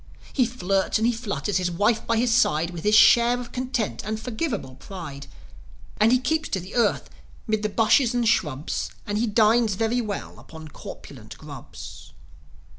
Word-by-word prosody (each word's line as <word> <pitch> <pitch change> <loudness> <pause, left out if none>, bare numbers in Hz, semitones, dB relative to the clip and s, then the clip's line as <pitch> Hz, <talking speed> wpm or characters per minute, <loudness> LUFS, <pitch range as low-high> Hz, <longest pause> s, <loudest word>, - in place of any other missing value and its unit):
He 255 -4 +2
flirts 195 -5 0
and 220 - 0
he 240 - +3
flutters, 210 -3 -2
his 180 -1 0
wife 210 +6 +1
by 230 - +2
his 235 0 +2
side, 165 -8 +2
With 170 -2 -7
his 210 +1 +4
share 240 +2 +6
of 240 -1 -8
content 250 -4 -2
and 215 +1 -3
forgiveable 220 - -4
pride. 155 -8 -8 0.7
And 215 +2 +4
he 255 - +5
keeps 315 +5 -1
to 190 - -1
the 185 +3 -10
earth, 235 - +1 0.4
'mid 215 -2 0
the 215 - -1
bushes 230 +3 +3
and 240 -1 +1
shrubs, 150 -9 0 0.2
And 205 0 -2
he 235 - +1
dines 220 0 +3
very 225 +4 0
well 210 -3 -6
upon 160 -1 -11
corpulent - - -11
grubs. - - -11
220 Hz, 175 wpm, -24 LUFS, 195-240 Hz, 0.7 s, share